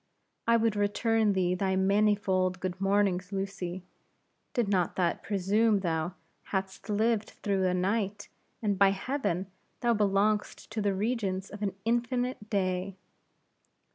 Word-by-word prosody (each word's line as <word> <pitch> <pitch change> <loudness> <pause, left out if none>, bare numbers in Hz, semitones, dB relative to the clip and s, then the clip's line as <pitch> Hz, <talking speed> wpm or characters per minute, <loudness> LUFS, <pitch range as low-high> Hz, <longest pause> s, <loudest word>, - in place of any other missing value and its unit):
"I 230 0 +5
would 225 -2 +1
return 210 +1 +2
thee 180 -2 +1
thy 190 +1 0
manifold 190 -2 +2
good 185 0 -4
mornings, 195 -2 +1
Lucy, 195 -2 -4 0.7
did 240 -5 +2
not 185 -4 +1
that 175 -2 0
presume 205 +1 +2
thou 165 0 -1 0.3
had'st 190 +1 -4
lived 215 +1 +1
through 195 -2 +1
a 180 - +1
night; 200 +2 -1 0.4
and 205 -3 0
by 200 -1 +7
Heaven, 195 -3 -1 0.4
thou 240 -1 +3
belong'st 210 0 +1
to 220 - -2
the 200 -1 +1
regions 195 -3 -1
of 205 +1 -9
an 195 -2 -1
infinite 240 -1 -1
day!" 185 -1 -1
200 Hz, 135 wpm, -29 LUFS, 190-215 Hz, 0.7 s, by